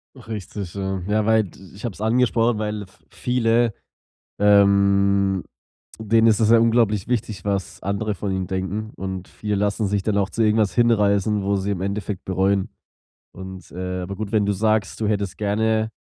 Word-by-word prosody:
Richtig, 105 -6 -7
ja. 95 -1 -3
Ja, 105 0 +1
weil 110 -1 +4
d 90 - -14 0.2
ich 100 - -12
hab's 110 -5 -5
angesprochen, 115 0 +2
weil 105 -1 -3
v 95 - -25
viele, 120 -2 +1 0.7
ähm, 100 -1 +4 0.6
denen 110 +1 +3
ist 110 -2 +4
es 110 -1 +3
ja 115 - +7
unglaublich 115 -3 +2
wichtig, 110 -6 -2
was 100 -2 -2
andere 100 +2 -2
von 100 +1 -3
ihnen 95 -1 -2
denken. 95 +4 -3
Und 95 -1 -5
viele 105 -1 -3
lassen 100 +1 0
sich 100 0 0
dann 100 +1 0
auch 100 -1 +1
zu 115 - -2
irgendwas 105 -1 +2
hinreißen, 105 -3 +2
wo 100 +1 +1
sie 100 +1 -1
im 95 -2 -3
Endeffekt 100 0 -4
bereuen. 95 +1 +1 0.6
Und, 95 -1 -9
äh 90 +1 -4
aber 95 +2 -5
gut, 105 0 -5
wenn 105 -2 +2
du 100 - +1
sagst, 110 +2 0
du 110 - +1
hättest 100 -3 -1
gerne 110 +1 0
100 Hz, 175 wpm, -22 LUFS, 95-110 Hz, 0.7 s, ja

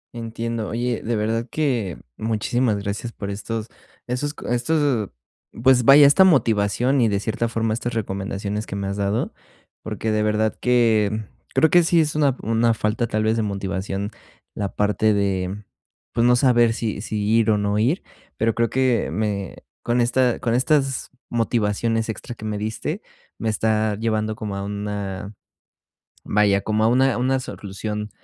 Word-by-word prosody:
Entiendo. 115 -1 -4
Oye, 120 +1 -2
de 115 +1 -1
verdad 110 +2 -1
que 120 - -1 0.2
muchísimas 110 +1 0
gracias 100 +3 -4
por 100 -2 -6
estos 110 +2 -4 0.4
esos 140 +4 -3
co - - -9
estos, 125 -3 +1 0.5
pues, 130 -1 +5
vaya, 140 +2 +9
esta 145 +7 +7
motivación 125 - +3
y, 115 - +4
de 100 -1 0
cierta 110 +2 -1
forma, 115 -1 -1
estas 120 +1 -3
recomendaciones 100 0 -3
que - - -5
me 100 0 -3
has 100 +1 -3
dado, 100 +2 -1 0.5
porque, 110 +1 -3
de 110 - +1
verdad 110 +1 +1
que, 115 -4 +3
mm, 110 0 -3 0.3
creo 160 - +5
que 175 - +7
sí 170 0 +3
es 155 -1 +1
una 140 -4 +2
una 115 +1 +2
falta, 110 +3 -1
tal 110 0 -1
vez, 110 +1 +1
de - - +1
motivación 100 0 -3 0.4
la 100 -2 -4
parte 105 +1 +2
de, 100 0 -1 0.5
pues, 115 - +1
no 125 - +5
saber 120 -2 +4
si 110 -3 -3
si 105 -1 -3
ir 110 0 +3
o 105 - +4
no 105 0 0
ir, 135 - +1 0.3
pero 115 0 +1
creo 115 +1 +1
que 130 0 +1
me 100 -2 -2 0.3
con 120 +1 0
esta 125 0 +2
con 115 - 0
estas 135 0 +1 0.2
motivaciones 115 -1 0
extra 120 +2 -6
que 110 - -9
me 105 -1 -2
diste, 110 +1 -3 0.4
me 110 - -1
está 110 0 +1
llevando 110 -1 -1
como 105 -2 -5
a 100 - -3
una 100 -1 -4 0.9
vaya, 100 -1 +2
como 110 0 0
a - - +5
una 130 +2 +3
una 130 +2 +1
solución 105 -3 -5
110 Hz, 170 wpm, -22 LUFS, 105-120 Hz, 0.9 s, vaya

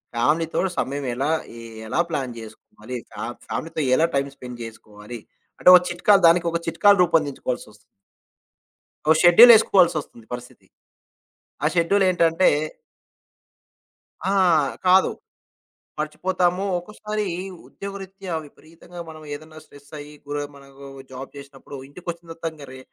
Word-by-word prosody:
ఫ్యామిలీతో 155 +7 +1 0.2
సమయం 140 +1 -2
ఎలా 140 +4 -1 0.3
ఎ - - -10 0.3
ఎలా 165 - -2
ప్లాన్ 130 -6 -3
చేసుకోవాలి, 110 +2 -11
ఫ్యా - - -7 0.2
ఫ్యామిలీతో 160 -1 -4
ఎలా 160 - +3
టైమ్ 140 0 0
స్పెండ్ 125 -2 -10
చేసుకోవాలి, 110 0 -10 0.4
అంటే - - +6
ఒక 180 - +7
చిట్కాలు 195 +3 +3
దానికి 170 0 +3
ఒక 170 - -1
చిట్కాలు 200 +5 +4
రూపొందించుకోవాల్సి 145 -8 -1
వస్తుంది. 105 - -20 1.3
ఓ 160 - +6
షెడ్యూలేసుకోవాల్సొస్తుంది 175 - +6
పరిస్థితి. 125 0 -9 1.0
ఆ - - +2
షెడ్యూలేంటంటే 175 -1 +3 1.8
ఆ! - - +1 0.6
కాదు. 185 +1 +5 0.9
మర్చిపోతాము. 180 +4 -1
ఒక్కోసారి 210 +3 -5 0.4
ఉద్యోగరీత్యా 195 -2 -8
విపరీతంగా 165 +4 -14
మనం 155 -1 -11
ఏదన్నా 155 +1 -11
స్ట్రెస్సయ్యి, 145 +1 -12
గుర 145 0 -4 0.2
మనకు 140 0 -14 0.3
జాబ్ 130 +1 -9
చేసినప్పుడు 140 0 -11
ఇంటికొచ్చిన 170 +2 -8
తర్వాత 165 0 -5
ఇంక 145 -2 -12
రే 130 - -10
160 Hz, 115 wpm, -22 LUFS, 140-180 Hz, 1.8 s, ఒక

